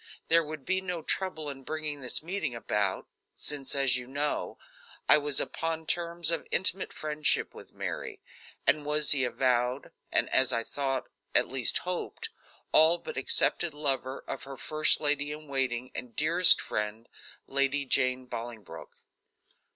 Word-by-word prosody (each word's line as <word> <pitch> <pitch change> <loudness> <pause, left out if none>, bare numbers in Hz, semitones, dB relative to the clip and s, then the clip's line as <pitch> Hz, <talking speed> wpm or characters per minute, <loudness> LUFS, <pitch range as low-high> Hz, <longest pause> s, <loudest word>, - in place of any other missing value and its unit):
There 165 0 +5
would 150 -3 -8
be 190 0 0
no 180 -4 -5
trouble 180 -5 -2
in 140 -2 -7
bringing 150 0 -5
this 125 +3 +1
meeting 175 -7 -3
about, 105 -4 -2 0.3
since, 145 -2 -3
as 135 -2 +2
you 125 -1 -8
know, 145 +3 -3 0.5
I - - +6
was 145 -1 0
upon 160 0 -3
terms 170 0 +2
of 165 - -3
intimate 190 +1 0
friendship 150 0 -1
with - - -14
Mary, - - -6 0.5
and 150 +2 +3
was 150 0 +1
the 135 -3 +3
avowed, 125 +1 -1 0.2
and, - - +3
as 130 -1 +4
I 115 - 0
thought, 135 +1 -3 0.3
at - - +4
least 130 -2 +1
hoped, 180 -1 -5 0.4
all 160 +2 +9
but - - -9
accepted 145 +4 +2
lover 135 -3 -2
of 135 - -5
her 135 0 -9
first 155 +3 +1
lady 145 0 +1
in 150 0 -9
waiting 130 -2 -2
and 125 -2 -7
dearest 170 +4 +6
friend, 105 +2 -4 0.4
Lady 140 +1 +2
Jane 130 -1 +1
Bolingbroke. 115 -3 -9
145 Hz, 150 wpm, -28 LUFS, 130-155 Hz, 0.5 s, all